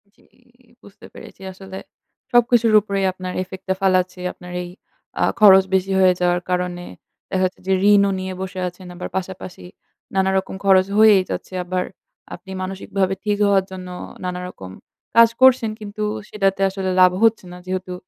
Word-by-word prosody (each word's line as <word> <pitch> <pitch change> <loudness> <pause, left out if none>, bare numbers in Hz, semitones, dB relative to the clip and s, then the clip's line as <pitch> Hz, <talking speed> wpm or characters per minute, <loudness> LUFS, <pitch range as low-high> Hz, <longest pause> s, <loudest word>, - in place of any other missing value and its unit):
জি, - - -28 0.6
বুঝতে 200 - -16
পেরেছি। - - -13
আসলে 190 0 -10 0.5
সবকিছুর 240 -2 +3
উপরেই 200 -1 -2
আপনার 185 0 -7
ইফেক্ট 185 0 -11
টা 190 - +2
ফালাচ্ছে। 185 -1 +1
আপনার 180 0 -12
এই 175 - -8 0.5
আ - - +4 0.2
খরচ 195 -3 +8
বেশি 190 +1 0
হয়ে 185 -1 +5
যাওয়ার 175 0 +1
কারণে 180 -1 -2 0.5
দেখা 190 0 0
যাচ্ছে 185 - -4
যে 190 - +2 0.2
ঋণও 200 -1 +4
নিয়ে 185 0 -5
বসে 190 0 -5
আছেন। 180 +1 -10
আবার 180 - -6
পাশাপাশি 185 -1 -7 0.5
নানা 190 0 +2
রকম 190 0 -3
খরচ 190 -1 +5
হয়েই 215 -3 +6
যাচ্ছে। - - -6
আবার 180 +1 -2 0.5
আপনি 190 - -13
মানসিকভাবে 190 0 -2
ঠিক 210 -1 0
হওয়ার 195 -2 +3
জন্য 185 -1 -8 0.4
নানারকম 180 - -6 0.4
কাজ 230 0 +7
করছেন 255 -4 +5
কিন্তু 210 0 -6 0.3
সেটাতে 195 -2 0
আসলে 190 0 -4
লাভ 180 0 +7
হচ্ছে 225 -3 +3
না। 180 - -10
যেহেতু 185 0 -4
190 Hz, 160 wpm, -20 LUFS, 185-200 Hz, 0.6 s, খরচ